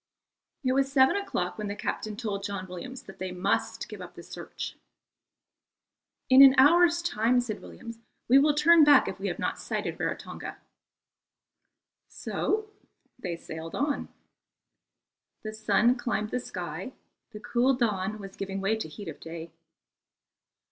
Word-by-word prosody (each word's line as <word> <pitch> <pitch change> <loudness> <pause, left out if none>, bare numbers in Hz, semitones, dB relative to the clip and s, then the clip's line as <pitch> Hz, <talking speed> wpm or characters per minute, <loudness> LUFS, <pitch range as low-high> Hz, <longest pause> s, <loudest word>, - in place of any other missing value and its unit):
It 255 - +2
was 270 0 +1
seven 265 +2 +5
o'clock 220 - -2
when 210 - -3
the 200 - -4
captain 210 +1 -4
told 205 -4 -3
John 200 -2 -4
Williams 250 +9 -8
that 195 - -13
they 185 0 -4
must 180 0 -1
give - - -9
up - - -10
the - - -10
search. - - -7 1.5
"In 260 +1 +8
an 270 -1 +9
hour's 340 +5 +5
time," 245 -6 +2
said 230 -4 -4
Williams, 230 0 -10 0.3
"we 265 +3 +7
will 295 +1 +3
turn 325 +2 +6
back 290 -1 +6
if - - -5
we - - -3
have - - -3
not - - -2
sighted - - -4
Rarotonga." - - -4 1.5
So 430 0 -2 0.5
they 180 -8 -4
sailed 160 0 -8
on. 285 +1 -1 1.3
The 215 0 -5
sun 215 +3 +3
climbed 215 -3 -2
the 250 - 0
sky, 180 - -6 0.4
the 210 - -9
cool 245 +3 +2
dawn 215 -4 -1
was 195 -2 -10
giving 195 0 -4
way 200 +3 +1
to 220 - -4
the - - -15
heat 205 - -8
of 155 - -7
day. 165 0 -8
220 Hz, 155 wpm, -28 LUFS, 195-265 Hz, 1.5 s, an